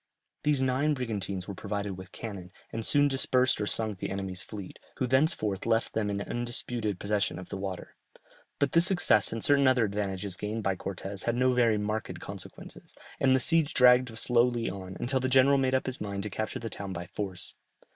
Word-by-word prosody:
These 145 -3 +1
nine 135 +4 +1
brigantines 100 -7 -3
were 100 - -5
provided 100 0 -4
with 95 0 -11
cannon, 95 -5 -7 0.2
and 115 - -3
soon 145 +4 +4
dispersed 130 -3 +2
or 105 - -1
sunk 110 -4 -1
the 100 - -3
enemy's 95 -1 -3
fleet, 100 -3 -9 0.2
who 130 - 0
thenceforth 125 - +1
left 115 0 +1
them 110 -2 0
in 100 0 -2
undisputed 120 -4 -2
possession 100 -3 -1
of 90 - -9
the - - -4
water. 95 -2 -6 0.6
But 140 - +1
this 170 +2 +5
success 175 - +4
and 115 -1 -4
certain 140 -1 +4
other 130 -3 +4
advantages 100 -2 -3
gained 105 +3 -4
by 95 -1 +1
Cortès 95 +1 -5
had 120 - +1
no 130 +1 +3
very 120 -3 +3
marked 105 +1 -3
consequences, - - -10 0.2
and 130 -1 +4
the - - +3
siege 160 +1 +3
dragged 125 -2 +5
slowly 120 -2 +2
on, 95 -1 -8
until 130 +2 +1
the 130 0 -1
general 135 +2 +5
made 130 -1 +2
up 130 - 0
his 130 -1 -4
mind 100 -1 -3
to 105 - -5
capture 110 +2 -3
the 115 -2 -6
town 100 -2 -6
by 85 0 -5
force. 95 0 -6
110 Hz, 195 wpm, -29 LUFS, 100-130 Hz, 0.6 s, this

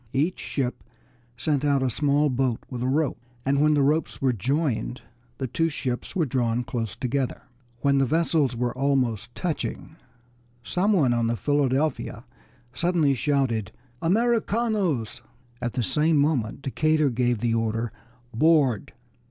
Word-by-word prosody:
Each 155 +7 0
ship 130 -3 -3 0.5
sent 145 +1 0
out 140 -2 +2
a 130 - +1
small 145 +2 +2
boat 125 -2 0
with 125 -2 -4
a 125 - 0
rope, 145 +1 0 0.3
and 140 +1 +2
when 150 0 +4
the 145 - +3
ropes 150 +2 +1
were 130 -2 +2
joined 125 - -1 0.4
the 135 - -2
two 165 +7 0
ships 130 +1 -4
were 170 -4 +2
drawn 120 -2 0
close 115 -3 -4
together. 130 0 -2 0.4
When 140 -1 +3
the 135 - +2
vessels 155 -4 +1
were 120 0 -1
almost 130 -5 0
touching 160 -2 -4 0.7
some 195 - +1
one 140 -10 +3
on 120 -1 +1
the 115 0 0
Philadelphia 145 +4 0 0.5
suddenly 165 -1 +2
shouted, 130 -6 0 0.3
"Americanos!" 210 - +1 0.4
At 120 - -2
the 125 - -1
same 150 - +2
moment 140 -4 0
Decatur 155 +1 +2
gave 120 0 +1
the 115 +2 0
order 115 0 -1 0.4
"Board!" 140 -4 +3
135 Hz, 145 wpm, -25 LUFS, 120-155 Hz, 0.7 s, when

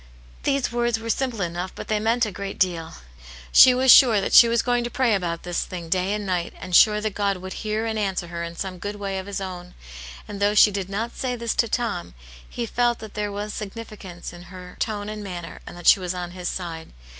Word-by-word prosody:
These 275 -3 0
words 240 -1 0
were 230 0 -2
simple 250 -5 -2
enough, 175 +1 -3
but - - -8
they 215 -1 0
meant 230 +2 +2
a 215 - -4
great 195 +1 -6
deal; 170 -4 -1 0.6
she 255 - +9
was 260 0 +5
sure 235 -6 +8
that 195 - -2
she 235 - +9
was 230 0 +1
going 245 -1 +1
to 240 - -3
pray 245 -2 +1
about 170 -4 -2
this 175 -1 -2
thing 175 -3 -7
day 185 +2 +1
and 210 -1 -3
night, 180 -3 -2
and 180 -1 -3
sure 210 +2 +6
that 215 -1 -2
God 200 -1 0
would 185 +1 -7
hear 215 +1 -2
and 220 -1 -2
answer 190 -4 -2
her 170 0 -5
in 170 0 -6
some 185 0 -5
good 205 +3 -5
way 195 -2 -3
of 190 - -8
His 200 0 -4
own. 180 -2 -7 0.5
And 205 -1 -7
though 205 +1 +2
she 210 - +7
did 195 -1 -4
not 225 +4 -3
say 250 -2 -2
this 235 -1 -2
to 230 - +1
Tom, 215 - -3 0.3
he 240 - -4
felt 240 +1 +1
that 220 -2 -10
there 210 -1 -3
was 205 +1 -5
significance 200 -5 -8
in 175 0 -12
her 180 -1 -11
tone 205 -2 -2
and 210 0 -6
manner, 175 -4 -7
and - - -9
that 175 - -11
she - - +7
was 180 0 -3
on 175 -1 -5
his 180 0 -6
side. 165 -3 -5
200 Hz, 240 wpm, -24 LUFS, 180-225 Hz, 0.6 s, she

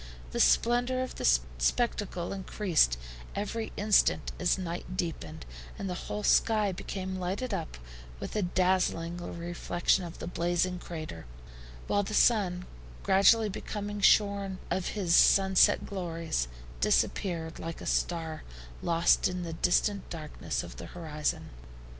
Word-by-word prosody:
The - - -3
splendor 245 +2 +3
of 255 - -6
the - - -4 0.3
spectacle 185 - 0
increased 185 - +1 0.4
every 220 +2 -3
instant 205 0 +3
as 180 +1 +2
night 180 0 -5
deepened, 80 - -4 0.3
and 195 - -4
the 180 - -2 0.2
whole 210 0 -3
sky 215 -2 +3
became 190 +1 -5
lighted 190 +8 -3
up - - -4 0.4
with - - -6
a 210 - +1
dazzling 180 -2 +1
reflection 175 +1 -1
of 170 -1 -8
the - - -6
blazing 175 +1 0
crater, 155 - -7 0.6
while 205 - +1
the 210 +1 -4
sun, 185 -7 +3 0.4
gradually 210 +3 +5
becoming 205 +1 -5
shorn 200 -2 +3
of 185 - 0
his 175 -4 +2
sunset 195 +1 +5
glories, 165 - -3 0.3
disappeared 165 - 0
like 165 0 -6
a - - -8
star 160 -2 -1 0.4
lost 170 0 +3
in 180 -1 -4
the 165 -1 -5
distant 190 +4 +1
darkness 115 - -4
of - - -10
the - - -8
horizon. 155 -3 -3
180 Hz, 130 wpm, -29 LUFS, 170-200 Hz, 0.6 s, gradually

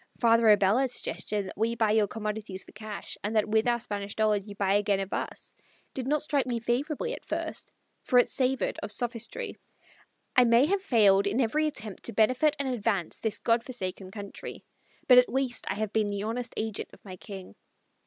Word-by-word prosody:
Father 230 -1 +5
Abella's 210 +5 +4
suggestion 210 -4 -2
that - - -8
we 230 +2 0
buy 220 -2 +2
your 215 -1 +3
commodities 210 -2 -5
for - - -16
cash, 215 -1 -6
and 210 +2 -2
that 215 - +3
with 220 +2 +2
our 240 0 +2
Spanish 200 -2 -4
dollars 215 -2 +1
you 205 - -8
buy 195 -1 +1
again 205 -1 +2
of 195 0 -4
us, - - -4 0.4
did 260 -1 -4
not 300 +1 +2
strike 285 -3 +1
me 240 -2 -1
favorably 290 - -1
at - - -8
first, - - -4 0.3
for 250 - +2
it 245 - +6
savored 260 0 0
of 205 - -3
sophistry. 245 - -2 0.8
I 250 - +7
may 235 +3 +5
have 390 +4 +1
failed 205 - +4
in 210 +5 0
every 300 +6 +2
attempt 220 -9 -6
to 235 - -4
benefit 255 +8 +3
and 280 - -2
advance 210 -8 -1
this 220 -2 -2
Godforsaken 230 -5 -2
country, 200 0 -8 0.4
but 250 -1 +9
at 250 - +3
least 260 -2 -1
I - - -1
have 215 0 -3
been 215 -1 +2
the 200 0 -3
honest 235 +2 -3
agent 220 -1 -3
of - - -18
my 185 -2 -8
King. 190 - -10
220 Hz, 195 wpm, -28 LUFS, 205-250 Hz, 0.8 s, but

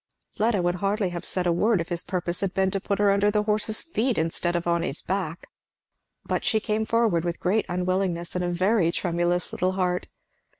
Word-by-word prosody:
Fleda 215 -4 +1
would 175 +1 +1
hardly 200 +1 0
have 175 -1 -5
said 185 -1 0
a 175 - +3
word 210 +4 +2
if 165 - -4
his 175 0 -1
purpose 175 -2 -2
had 195 -2 -2
been 190 -1 +2
to 195 - -2
put 200 0 -1
her 205 -1 +4
under 200 +1 +3
the 210 0 +1
horse's 215 +1 +1
feet 255 -7 -1
instead 165 +2 0
of 170 - -1
on 170 0 +1
his 155 -3 -3
back. 180 -3 -3 0.8
But - - -1
she 220 - +2
came 215 0 -1
forward 225 -8 +2
with 175 -1 -3
great 205 +4 +1
unwillingness 180 -1 -1
and 180 - -1
a 175 - 0
very 185 0 +2
tremulous 175 0 0
little 185 +1 0
heart. 180 -1 -1
185 Hz, 210 wpm, -25 LUFS, 175-205 Hz, 0.8 s, her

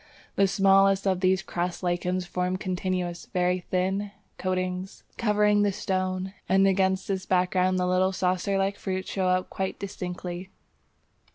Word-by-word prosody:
The 195 - +4
smallest 195 0 +4
of 190 -2 +2
these 190 0 +2
crust 175 +1 -3
lichens 180 +1 -1
form 180 +1 -1
continuous, 185 -2 -3
very 180 0 +2
thin, 190 +3 -1 0.3
coatings, 185 0 -3
covering 210 -2 +3
the 205 -1 +3
stone; 185 -1 -2 0.2
and 195 +1 +5
against 190 0 +1
this 190 -1 -2
background 185 0 +2
the 180 - +1
little 185 +1 +2
saucer 185 +1 0
like 195 +1 0
fruits 190 -1 -3
show 190 -2 0
up 185 0 +1
quite 190 0 -3
distinctly. 180 -1 -6
185 Hz, 145 wpm, -27 LUFS, 180-195 Hz, 0.3 s, and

